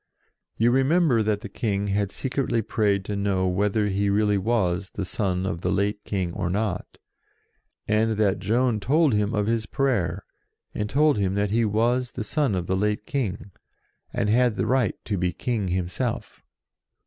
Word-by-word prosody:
You 115 +2 +3
re 130 +2 +4
member 145 -4 +3
that 105 -1 0
the 115 - -6
King 100 -1 -2
had 100 0 0
secretly 130 -4 -1
prayed 100 -3 0
to 105 - -3
know 100 -2 0
whether 105 +3 +1
he 100 0 0
really 105 0 +2
was 95 -4 0
the 100 - -2
son 95 -1 -1
of 85 -3 -3
the - - 0
late 105 +1 0
King 95 -4 -2
or 85 - -2
not, 100 -1 -2 0.9
and 110 +1 +2
that 100 -3 +2
Joan 115 +2 +1
told 150 +5 +3
him 105 +1 +1
of 105 -1 +1
his 110 -1 -1
prayer, 100 - 0 0.5
and 105 0 -3
told 150 -2 +3
him 95 -1 0
that 100 0 0
he 115 +1 +2
was 120 +4 +1
the 115 - -4
son 140 -3 0
of 90 -2 -2
the 95 - 0
late 105 +2 0
King, 105 -7 -3 0.6
and - - -1
had 120 +1 +3
the - - -1
right 125 -6 +1
to 100 -4 -2
be 90 0 +1
King 110 +1 -2
himself. 90 0 -3
105 Hz, 180 wpm, -25 LUFS, 95-115 Hz, 0.9 s, re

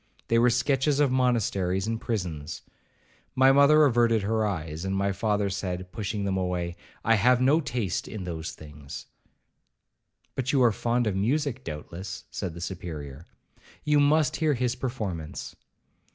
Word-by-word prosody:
They 115 - +4
were 120 +1 +5
sketches 135 +4 +1
of 145 -3 +3
monasteries 100 -7 +1
and 115 0 -2
prisons. 85 -9 -4 0.7
My 130 0 +6
mother 145 +2 +6
averted 115 -4 +3
her 110 +1 +1
eyes—and 85 +1 -3
my 100 0 +1
father 105 +1 0
said, 90 -2 -4
pushing 100 0 -3
them 95 -1 0
away, 90 -2 -2 0.3
'I 115 - +5
have 125 +4 +4
no 135 +5 +4
taste 120 - -2
in 105 -4 -6
those 85 -2 -5
things.' 75 -2 -10 1.3
'But 130 0 -1
you 135 -3 +4
are 120 - +5
fond 120 +3 0
of 105 -3 0
music 130 +5 0
doubtless,' 90 +5 -7
said 90 -5 -4
the 85 - -8
Superior; 80 -5 -6 0.6
'you 150 0 +3
must 145 0 +3
hear 155 -2 +2
his 125 -1 0
performance.' 105 - -5
105 Hz, 150 wpm, -27 LUFS, 90-125 Hz, 1.3 s, My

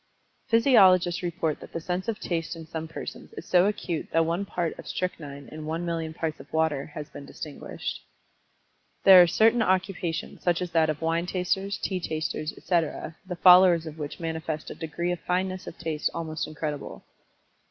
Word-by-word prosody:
Physiologists 190 -8 +5
report 170 -3 -2
that - - -12
the - - -2
sense 180 +4 -3
of 225 -2 -2
Taste 165 -1 -2
in 165 -1 -9
some 160 0 -5
persons 165 - -8
is 405 - -8
so 180 +1 +4
acute 180 -5 -2
that 165 0 +3
one 170 +5 -1
part 175 -3 -2
of - - -9
strychnine 145 -6 -4
in 155 0 -8
one 165 +2 -2
million 165 -2 -2
parts 160 -1 -4
of 135 - -13
water 160 -3 0
has 150 -1 -5
been - - -9
distinguished. 145 +1 -6 1.0
There 190 -2 +10
are 175 - +6
certain 225 +6 +4
occupations, 185 -4 -1
such 175 -2 +1
as 180 -1 -4
that 160 -2 +3
of 155 +1 -3
wine 165 +2 0
tasters, 190 +2 -1
tea 190 -2 -2
tasters, 155 -2 -3
etc., 165 -2 -1
the 180 - -4
followers 180 -1 +7
of 160 0 -8
which 145 -1 -5
manifest 160 -2 -4
a - - -4
degree 170 +2 -3
of 175 - -2
fineness 185 +1 -2
of - - -8
Taste 160 -3 -1
almost 160 -1 -3
incredible. 150 -2 -5
170 Hz, 180 wpm, -27 LUFS, 160-185 Hz, 1.0 s, There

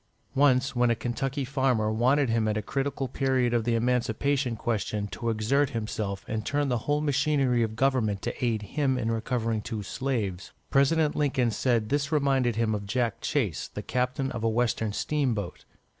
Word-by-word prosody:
Once, 135 -1 +3
when 120 0 +3
a 115 - +3
Kentucky 135 +4 -2
farmer 130 -5 +1
wanted 130 +5 +3
him 115 -1 +1
at 105 0 0
a - - 0
critical 135 +2 -2
period 130 -2 +1
of 115 -2 +1
the 120 -1 +2
Emancipation 125 +2 0
question 105 -2 -2
to 115 +3 -4
exert 115 +6 +1
himself 105 -3 -4
and 110 -1 -2
turn 145 +4 0
the 120 -2 +1
whole 145 +1 +2
machinery 140 -4 +2
of 110 -1 -1
government 120 -5 +1
to - - -4
aid 115 -3 0
him 135 +3 0
in 115 -2 -1
recovering 115 -1 -1
two 110 -2 -5
slaves, 105 -6 -3 0.2
President 150 +3 +3
Lincoln 130 -5 +1
said 115 -1 +1
this 145 +1 0
reminded 135 -5 +2
him 110 -1 +1
of 100 -1 -4
Jack 120 0 -1
Chase, 105 - -1
the - - -7
captain 125 +2 -1
of 115 - -5
a 115 - +3
western 115 -1 0
steamboat. 125 -3 -2
120 Hz, 175 wpm, -27 LUFS, 110-135 Hz, 0.2 s, Once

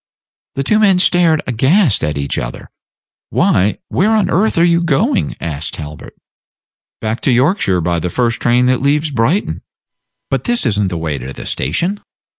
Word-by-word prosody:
The 135 - -1
two 215 +10 +2
men 200 -4 +4
stared 175 -3 +2
aghast 135 - +2
at 75 -1 -1
each 70 -1 -2
other. - - -7 0.6
"Why, 100 +3 +2
where 215 +4 +2
on 215 -3 +1
earth 205 +4 +1
are 165 - +4
you 170 0 +3
going?" 190 - 0
asked 75 -2 -4
Talbot. 75 -1 -9 0.9
"Back 110 +1 -3
to 135 - +1
Yorkshire 125 - +2
by 85 0 0
the 90 - -3
first 120 +3 -1
train 120 +1 +2
that 125 -1 +1
leaves 150 +2 +1
Brighton." 135 - 0 0.7
"But - - -1
this 240 - 0
is 105 -4 +1
n't 100 -2 +1
the 90 - -4
way 80 -4 -3
to 65 +2 -7
the - - -9
station!" 195 +4 -1
130 Hz, 175 wpm, -16 LUFS, -, 0.9 s, men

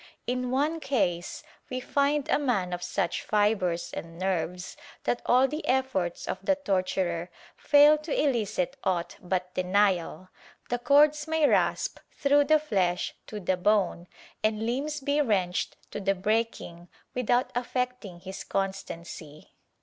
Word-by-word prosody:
In 250 0 -1
one 295 +6 0
case 190 - -1 0.3
we 255 - -3
find 280 +2 +1
a - - +2
man 205 -11 0
of 175 - -4
such 175 -1 -1
fibres 205 -5 0
and 165 0 -7
nerves 180 -1 -2 0.3
that 245 - 0
all 255 +2 +5
the 300 +4 -5
efforts 255 -10 0
of - - -4
the 290 - +3
torturer 185 - -1 0.3
fail 295 +1 +6
to 305 0 -8
eUcit 260 -1 0
aught 180 -3 -1
but 180 0 -2
denial 185 -1 +1 0.2
— - - -27
the 245 - 0
cords 295 +3 +4
may 320 -2 +3
rasp - - +1
through 285 0 +3
the 310 +1 +5
flesh 190 -12 0
to 210 - -6
the 185 -1 0
bone 185 -2 +1 0.4
and 215 0 +1
limbs 285 +5 -2
be 285 +2 +1
wrenched 190 -8 0
to - - -4
the 195 0 +1
breaking 200 -4 -2 0.3
without 250 +1 +1
affecting 245 -6 -3
his 190 +1 -7
constancy. 170 -5 -5
215 Hz, 140 wpm, -28 LUFS, 180-270 Hz, 0.4 s, fail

